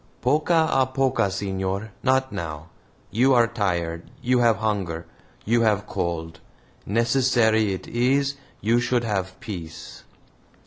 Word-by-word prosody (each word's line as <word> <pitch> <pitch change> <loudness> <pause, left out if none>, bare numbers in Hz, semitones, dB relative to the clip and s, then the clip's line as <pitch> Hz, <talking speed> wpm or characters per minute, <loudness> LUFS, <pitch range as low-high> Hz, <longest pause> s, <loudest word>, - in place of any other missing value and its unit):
"POCO 160 +4 +3
A 130 - +2
POCO, 130 -6 +1
senor 95 +2 -3
not 130 0 +2
now. 80 -4 -6 0.4
You 125 +5 +4
are 120 -1 +6
tired, 85 -7 -2
you 125 0 +2
have 115 -3 +4
hunger, 95 -6 -2 0.4
you 115 +2 +3
have 105 -2 +2
cold. 80 -1 -3 0.5
Necessary 115 -1 +2
it 95 - -7
is 135 +4 +1 0.3
you 115 +3 +3
should 120 0 +1
have 95 -4 -2
peace." 85 -7 -8
110 Hz, 125 wpm, -24 LUFS, 95-125 Hz, 0.5 s, are